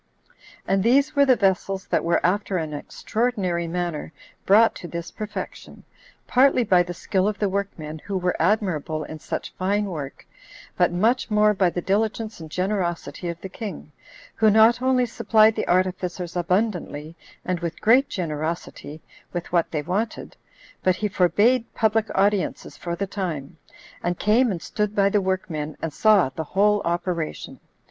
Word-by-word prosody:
And 195 0 +2
these 275 +7 +3
were 280 0 +5
the 255 - +6
vessels 195 -2 0
that - - +1
were 170 - +1
after 195 +1 +1
an 160 -3 -3
extraordinary 185 +1 -2
manner 170 -3 -3 0.4
brought 220 +4 +6
to 175 - -8
this 170 -1 -6
perfection, 215 -1 -7 0.4
partly 255 0 +4
by 185 -5 +4
the 175 0 -4
skill 190 +2 0
of 210 -1 -1
the 205 - 0
workmen, 185 -6 -4
who 195 +4 -4
were 180 -1 0
admirable 165 -5 0
in 155 +1 -8
such - - -5
fine 200 +3 +1
work, 155 -8 -6 0.5
but - - +3
much 225 +10 +1
more 210 0 +4
by 190 -3 +2
the 175 0 -4
diligence 215 +1 -1
and 160 -1 -9
generosity 180 -1 -2
of 170 0 -5
the - - -5
king, 190 -6 -7 0.4
who 220 -1 +3
not 220 +3 +5
only 255 -1 +3
supplied 220 -1 +3
the - - -2
artificers 180 -1 -1
abundantly, 175 -4 -1 0.3
and 180 -1 -1
with 170 -1 -4
great 250 +6 +4
generosity, 155 -2 -4 0.3
with 175 -1 -5
what 170 -2 +2
they 150 -2 -3
wanted, 205 +7 -3 0.5
but 185 -1 +2
he 210 +3 -1
forbade 210 +7 +2
public 220 0 +2
audiences 200 0 0
for 170 -1 -4
the 200 - -2
time, 175 -8 -5 0.5
and 175 0 -1
came 230 +5 +3
and 180 -5 -4
stood 210 -1 -2
by 200 -1 +4
the 205 0 +2
workmen, 165 -5 -3
and 165 -2 -4
saw 210 -5 +4
the 160 +4 -5
whole 205 +5 +2
operation. 170 -2 -3
190 Hz, 160 wpm, -24 LUFS, 170-215 Hz, 0.5 s, the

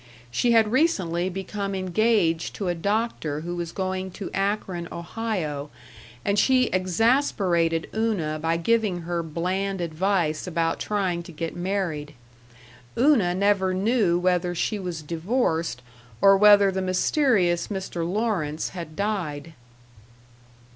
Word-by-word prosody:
She 235 - +2
had 220 -2 +4
recently 185 - +1
become 195 +1 -4
engaged 185 -3 +1
to 195 -3 -2
a - - +1
doctor 190 -5 -1
who 175 +2 -4
was 170 -1 -4
going 190 -1 -3
to 195 - -6
Akron, 195 -3 -2
Ohio, 170 -6 -4 0.6
and 200 0 +2
she 255 +2 +3
exasperated 185 - +1
Una 195 -9 -1
by 165 +1 0
giving 205 0 +1
her 170 0 -2
bland 185 +4 -2
advice 170 -1 0
about 165 -1 -1
trying 190 -5 -1
to 170 - -11
get 165 +1 -5
married. 175 -5 -3 0.8
Una 230 -9 +4
never 190 -1 +2
knew 200 -3 +2
whether 180 0 +1
she 210 +5 -1
was 175 -4 -5
divorced, 165 - -1 0.4
or 195 0 +7
whether 205 0 +6
the 190 0 -2
mysterious 185 - +2
Mr. 190 -3 -5
Lawrence 190 -8 -1
had 170 -4 -8
died. 165 -7 -3
185 Hz, 125 wpm, -25 LUFS, 170-205 Hz, 0.8 s, or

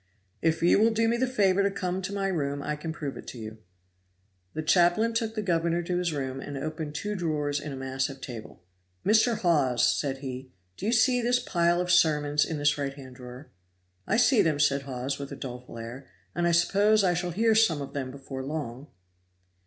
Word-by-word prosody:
"If 165 0 +1
you 175 - +5
will 225 +2 +5
do 225 0 +1
me 230 - +2
the 260 +2 +1
favor 200 -6 +2
to 200 - +2
come 185 -1 -3
to 190 +2 -4
my 200 -1 -2
room 140 -6 -2
I 150 +1 -2
can 160 +2 -5
prove 145 -4 -5
it - - -10
to - - -8
you." 110 -1 -8 1.0
The 155 - -2
chaplain 175 +8 +3
took 225 -1 -1
the 215 - -2
governor 170 -2 0
to 175 +1 -1
his 175 -2 0
room 135 -3 -3
and 145 0 -6
opened 155 +1 -5
two 210 +6 -3
drawers 150 -5 -1
in 145 +1 -6
a - - -5
massive 135 +1 -3
table. 115 -9 -9 0.4
"Mr. 220 +3 +4
Hawes," 145 -9 +2
said 135 -2 -2
he, 130 -1 -7 0.3
"do 200 - -5
you - - +2
see 245 +2 +3
this 245 +1 +2
pile 175 -7 +1
of 180 0 0
sermons 150 -4 +3
in 160 - -4
this 145 0 +1
right 140 -1 -3
hand 130 -3 -12
drawer?" 125 +3 -11 0.6
"I 225 - +2
see 245 0 +5
them," 155 -3 +1
said 140 -1 +3
Hawes, 135 0 -4
with 140 -1 -6
a - - -5
doleful 125 -2 -8
air, 120 +4 -8 0.3
"and 175 - 0
I - - +3
suppose 200 +5 +3
I 180 -2 +3
shall 175 +1 -2
hear 220 +6 +2
some 215 -9 +3
of 140 -1 -7
them 135 -2 -3
before 135 0 -7
long." 140 -2 -5
155 Hz, 215 wpm, -27 LUFS, 135-195 Hz, 1.0 s, you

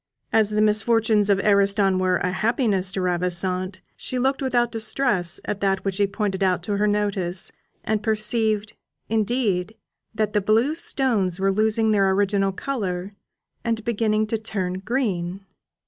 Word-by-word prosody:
As 220 -2 +4
the 210 0 +1
misfortunes 215 -1 +2
of 200 -1 +3
Ariston 200 -2 +3
were 185 -1 +2
a 180 - -1
happiness 205 -3 0
to 195 - -2
Ravissante, 180 +1 -1
she 255 - -5
looked 265 +2 0
without 240 -3 +1
distress 220 -6 +1
at 205 - -3
that 195 -1 0
which 195 -1 -1
he 200 - +3
pointed 200 -1 -3
out 185 -3 +1
to 205 +1 -1
her 210 +1 +2
notice, 200 -4 -1 0.3
and 215 -1 -1
perceived, 215 -1 +1 0.4
indeed, 220 -3 0 0.4
that 215 -1 -1
the 210 - +2
blue 225 +8 +2
stones 230 - 0
were 195 0 +2
losing 220 +2 +2
their 200 -2 +3
original 195 0 +1
colour, 195 -5 -4 0.5
and 230 -2 -1
beginning 215 -2 +1
to 220 +1 -2
turn 185 -4 -3
green. 195 -5 -2
205 Hz, 150 wpm, -23 LUFS, 190-220 Hz, 0.5 s, As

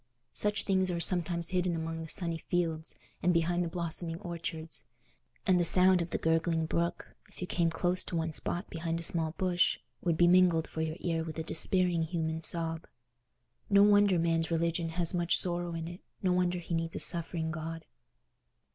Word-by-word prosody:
Such 210 0 0
things 190 -1 +1
are 175 -1 -2
sometimes 170 -1 +1
hidden 180 -1 0
among 165 0 -4
the 160 - -8
sunny 170 -2 0
fields 165 -3 -3 0.3
and 180 - +2
behind 175 +1 +1
the - - -2
blossoming 170 0 -4
orchards; 165 -3 -6 0.6
and 185 -2 +3
the - - +2
sound 180 +1 +7
of 170 - -4
the - - -2
gurgling 165 0 0
brook, 170 +2 -3
if - - -17
you 180 - -3
came 170 -2 0
close 180 +2 +2
to - - -4
one 165 -1 -2
spot 175 +5 -2
behind 165 0 -4
a - - -5
small 160 -1 0
bush, 180 -2 +1 0.2
would 170 -3 0
be 175 - +5
mingled 175 -2 +4
for 160 - -5
your 160 0 -3
ear 165 -2 -1
with 160 -1 -7
a 160 - -3
despairing 175 +1 +2
human 160 -1 -3
sob. 165 0 -3 0.8
No 200 0 +6
wonder 205 -2 +4
man's 165 -1 0
religion 165 0 -1
has 170 +1 -1
much 175 -1 +2
sorrow 175 -1 0
in 165 0 -5
it: 175 +2 -9 0.2
no 185 -1 +2
wonder 180 0 +1
he 175 0 -6
needs 165 0 -2
a - - -3
suffering 160 +1 0
God. 165 0 -6
170 Hz, 190 wpm, -30 LUFS, 165-180 Hz, 0.8 s, sound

